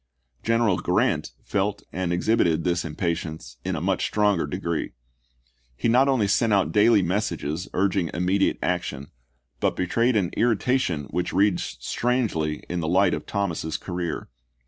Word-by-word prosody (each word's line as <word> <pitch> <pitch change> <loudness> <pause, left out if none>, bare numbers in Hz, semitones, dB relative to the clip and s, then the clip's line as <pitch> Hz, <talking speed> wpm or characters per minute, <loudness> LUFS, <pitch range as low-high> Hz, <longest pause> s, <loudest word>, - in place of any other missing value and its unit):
General 115 -5 +2
Grant - - 0
felt 100 0 -1
and 90 -1 -1
exhibited 85 -3 +2
this 90 -1 0
impatience 80 -4 -4
in - - -2
a - - -3
much - - 0
stronger 105 -4 +1
degree. - - -3 0.8
He - - 0
not 130 +4 +5
only 130 -7 +2
sent 115 +3 +2
out 100 -2 +2
daily 105 -1 +5
messages 90 -3 -2
urging 95 -3 +1
immediate 95 +4 +1
action, 70 +4 -2 0.5
but - - +1
betrayed 115 +7 +1
an 95 -5 +1
irritation 115 - +1
which 90 0 -2
reads 95 -8 +1
strangely 100 - -1
in 90 - -2
the 80 - -2
light 95 +4 +3
of - - -4
Thomas's 85 -5 -2
career. 90 -2 -4
95 Hz, 145 wpm, -25 LUFS, 85-105 Hz, 0.8 s, not